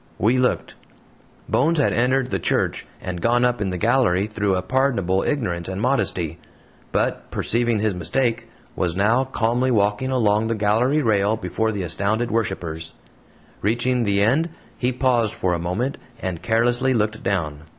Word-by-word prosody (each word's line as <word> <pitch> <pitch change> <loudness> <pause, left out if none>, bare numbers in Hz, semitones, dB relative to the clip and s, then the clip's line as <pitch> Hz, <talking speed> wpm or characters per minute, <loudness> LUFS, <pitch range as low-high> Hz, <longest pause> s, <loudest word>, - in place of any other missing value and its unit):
We 120 +4 +2
looked. 125 - 0 0.7
Bones 165 +5 +2
had 145 - +2
entered 125 +2 +1
the - - 0
church - - -1
and 90 -2 -5
gone 120 +1 +3
up 125 -3 0
in 100 - 0
the 90 - -3
gallery 105 -3 +2
through 105 -2 -1
a 90 - -2
pardonable 110 -7 +1
ignorance 90 - -2
and 95 0 -4
modesty; 90 - -1 0.5
but, - - -1
perceiving 120 -1 +1
his 110 -2 +1
mistake, 115 +7 -1 0.3
was 85 -2 -1
now 110 +7 +3
calmly 125 0 0
walking 105 +2 +1
along 110 -4 +2
the 115 - 0
gallery 115 +8 +2
rail 105 -1 +2
before 110 +3 -1
the 100 -3 -3
astounded 100 +7 -1
worshipers. 85 -7 -3 0.7
Reaching 120 +4 +1
the 100 -3 +2
end, 145 +10 +2 0.3
he 125 0 0
paused 120 -4 +1
for 90 -1 0
a 85 - -1
moment, 95 +11 -2 0.2
and 90 -3 -4
carelessly 120 +5 +2
looked 110 -1 -1
down. 80 -6 -2
110 Hz, 160 wpm, -22 LUFS, 95-125 Hz, 0.7 s, gone